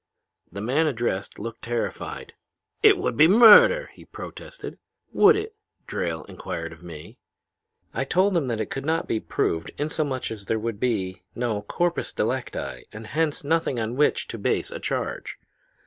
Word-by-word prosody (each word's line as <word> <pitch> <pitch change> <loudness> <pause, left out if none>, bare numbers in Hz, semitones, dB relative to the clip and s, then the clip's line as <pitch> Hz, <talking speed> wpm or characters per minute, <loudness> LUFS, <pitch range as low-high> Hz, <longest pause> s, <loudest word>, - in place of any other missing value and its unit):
"The 100 +3 -6
man 140 +9 +2
addressed 115 -8 -2
looked 115 0 -7
terrified. 120 0 -4 0.5
'It - - +7
would - - -1
be 155 +6 +7
murder!' 485 - +8
he - - -15
protested. - - -9 0.3
"'Would 425 +1 +7
it?' 430 +1 -4 0.3
Drayle 80 -2 -3
inquired 85 0 -6
of 80 - -16
me. 80 -3 -11 0.7
"I 130 - -1
told 185 +7 +2
him 160 -6 +1
that 115 -3 -2
it - - -3
could 135 - -3
not 160 +3 0
be 110 - 0
proved 80 -5 -1
inasmuch 145 -4 -2
as 105 -3 -7
there 110 - 0
would 110 -1 -4
be 95 -7 -1
no 115 -4 -1
corpus 175 +11 -1
delicti - - -3
and 110 +1 -9
hence 155 -1 0
nothing 155 -4 0
on 115 +2 -2
which 150 +2 +2
to - - -6
base - - 0
a - - -5
charge. - - -3
125 Hz, 165 wpm, -25 LUFS, 110-165 Hz, 0.7 s, murder